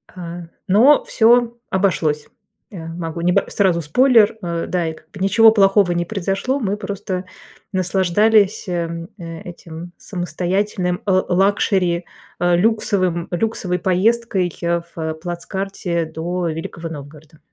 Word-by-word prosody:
А. 175 Hz, -1 st, -7 dB, 0.3 s
Но 240 Hz, +10 st, +5 dB
всё 235 Hz, 0 st, +3 dB
обошлось. 165 Hz, -6 st, 0 dB, 0.4 s
А, 195 Hz, -, -9 dB
могу 165 Hz, 0 st, -5 dB
неб 175 Hz, +1 st, +3 dB
сразу 185 Hz, -4 st, +2 dB
спойлер, 225 Hz, -, +4 dB
а, 170 Hz, -2 st, -3 dB
да, 175 Hz, -3 st, -1 dB
и 160 Hz, -, -3 dB
как 160 Hz, 0 st, -19 dB
бы 195 Hz, -, -11 dB
ничего 220 Hz, +4 st, +6 dB
плохого 195 Hz, -3 st, +4 dB
не 175 Hz, 0 st, 0 dB
произошло. 195 Hz, +8 st, -2 dB
Мы 205 Hz, -3 st, -1 dB
просто 195 Hz, -2 st, -4 dB, 0.5 s
наслаждались, 195 Hz, +3 st, +2 dB
эм, 170 Hz, -1 st, -3 dB
этим 170 Hz, -1 st, -9 dB
самостоятельным 180 Hz, +1 st, -2 dB
л 185 Hz, -2 st, +2 dB
лакшери, 185 Hz, -2 st, +2 dB, 0.3 s
а, 175 Hz, 0 st, +3 dB
люксовым 185 Hz, -4 st, +1 dB
люксовой 180 Hz, -1 st, -1 dB
поездкой 195 Hz, 0 st, +1 dB, 0.4 s
в 160 Hz, -1 st, -3 dB
плацкарте 175 Hz, +1 st, -3 dB
до 170 Hz, +2 st, -3 dB
Великого 165 Hz, +1 st, -6 dB
Новгорода. 150 Hz, +1 st, -11 dB
180 Hz, 120 wpm, -20 LUFS, 170-200 Hz, 0.5 s, ничего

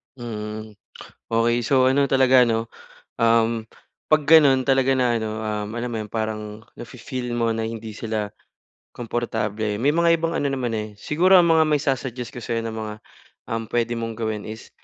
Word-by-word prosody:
Mm. 110 Hz, -3 st, -6 dB, 0.6 s
Okey, 115 Hz, +1 st, +2 dB
so 130 Hz, +2 st, +3 dB
ano 140 Hz, +1 st, +3 dB
talaga 130 Hz, -2 st, +5 dB
'no, 115 Hz, 0 st, -1 dB, 0.5 s
um, 115 Hz, -1 st, +2 dB, 0.5 s
'pag 155 Hz, -1 st, +4 dB
gano'n 145 Hz, -4 st, +6 dB
talaga 135 Hz, 0 st, +3 dB
na 125 Hz, -2 st, +2 dB
ano, 110 Hz, -1 st, -4 dB
um, 105 Hz, -1 st, -3 dB
alam 120 Hz, +1 st, -3 dB
mo 115 Hz, -, -4 dB
'yon, 105 Hz, -2 st, -9 dB
parang 110 Hz, -1 st, -4 dB, 0.2 s
nafi-feel 125 Hz, 0 st, -6 dB
mo 115 Hz, -1 st, +1 dB
na 110 Hz, 0 st, -2 dB
hindi 110 Hz, -1 st, -6 dB
sila 110 Hz, -2 st, -3 dB, 0.6 s
komportable, 110 Hz, -3 st, -3 dB
may 145 Hz, +5 st, +2 dB
mga 170 Hz, -1 st, +3 dB
ibang 165 Hz, 0 st, -1 dB
ano 140 Hz, -3 st, 0 dB
naman, 125 Hz, -4 st, -2 dB
eh 110 Hz, 0 st, -3 dB
siguro 180 Hz, -, +4 dB
ang 175 Hz, -, +4 dB
mga 160 Hz, -1 st, +5 dB
ma-i-sa-suggest 135 Hz, -5 st, -1 dB
ko -, -, -5 dB
sa'yo 115 Hz, 0 st, -2 dB
na 110 Hz, -1 st, -4 dB
mga, 110 Hz, -1 st, -5 dB, 0.6 s
um, 115 Hz, 0 st, -1 dB
pwede 120 Hz, +1 st, -1 dB
mong 115 Hz, 0 st, -4 dB
gawin 110 Hz, -2 st, -4 dB
is, 110 Hz, +1 st, -9 dB
115 Hz, 170 wpm, -23 LUFS, 110-130 Hz, 0.6 s, gano'n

